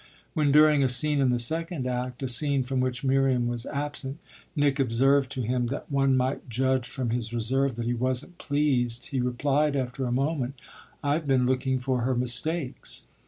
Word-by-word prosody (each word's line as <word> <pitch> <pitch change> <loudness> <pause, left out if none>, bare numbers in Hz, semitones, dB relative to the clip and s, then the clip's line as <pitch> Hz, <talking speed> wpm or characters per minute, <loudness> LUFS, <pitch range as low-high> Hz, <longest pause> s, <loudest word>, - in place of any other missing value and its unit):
When 150 -2 +1
during 150 -1 +5
a 130 - +2
scene 145 +4 +4
in 130 - +3
the 125 - +2
second 160 +3 +1
act 125 +1 -3
a - - -1
scene 135 +2 +2
from 130 +1 -2
which 130 0 -2
Miriam 135 -2 +2
was 120 0 -3
absent 140 -1 -4 0.4
Nick 145 -2 +1
observed 135 +2 +2
to 130 - -3
him 125 +1 -1
that 140 +4 -6
one 135 -1 +2
might 130 0 -2
judge 130 +1 0
from 125 -4 -3
his 115 -1 -2
reserve 130 +3 0
that 120 0 -4
he 120 - 0
wasn't 130 +8 -3
pleased 135 -2 0
he 135 -4 -2
replied 140 +4 0
after 130 -1 -2
a - - -3
moment: 135 0 -1 0.5
"I've 145 +2 0
been 130 -2 +3
looking 130 +1 0
for 130 -1 -1
her 130 +2 0
mistakes." 125 +4 0
130 Hz, 185 wpm, -26 LUFS, 125-140 Hz, 0.5 s, during